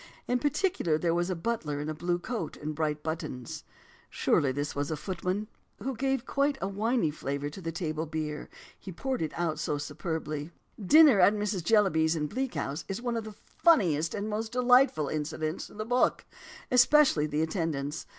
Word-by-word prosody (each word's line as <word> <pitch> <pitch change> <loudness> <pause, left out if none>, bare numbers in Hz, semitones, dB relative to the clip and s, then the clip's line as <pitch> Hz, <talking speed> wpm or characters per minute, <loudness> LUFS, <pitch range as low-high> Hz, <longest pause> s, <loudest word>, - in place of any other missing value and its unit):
In 250 0 +1
particular 290 - +1
there 165 +1 0
was 175 +1 0
a 185 - -1
butler 165 -6 -2
in 150 - -4
a 155 - -2
blue 175 +3 -1
coat 195 -3 -5
and 155 +1 -4
bright 150 -1 -2
buttons" 155 -6 -5 0.5
[surely 140 -2 +2
this 145 +2 -3
was 145 0 -2
a 155 - -2
footman?] 185 +5 -3 0.3
"who 260 +5 -4
gave 270 +1 -1
quite 280 0 +1
a 195 - -2
winey 205 -3 0
flavour 140 0 -4
to 190 - -9
the 165 -2 -3
table 160 -1 -3
beer, 150 -1 -4 0.3
he 190 - -8
poured 260 +8 -3
it 155 -2 -1
out 165 -3 -1
so 150 -2 -1
superbly." 150 0 -4 0.3
Dinner 295 - +7
at 195 +3 +6
Mrs. 205 -4 -2
Jellyby's 165 -6 +3
in 150 -2 -1
Bleak 260 - -3
House 140 +1 -3
is 195 +1 -3
one 240 -1 -2
of 225 -1 -3
the 215 - -8
funniest 175 - +2
and 205 0 -3
most 220 +1 -3
delightful 250 - +4
incidents 155 +2 -3
in - - -15
the 215 - -3
book, 245 +2 +1 0.5
especially 250 - +5
the 150 +1 0
attendance. 160 -3 -3
170 Hz, 185 wpm, -29 LUFS, 155-225 Hz, 0.5 s, Dinner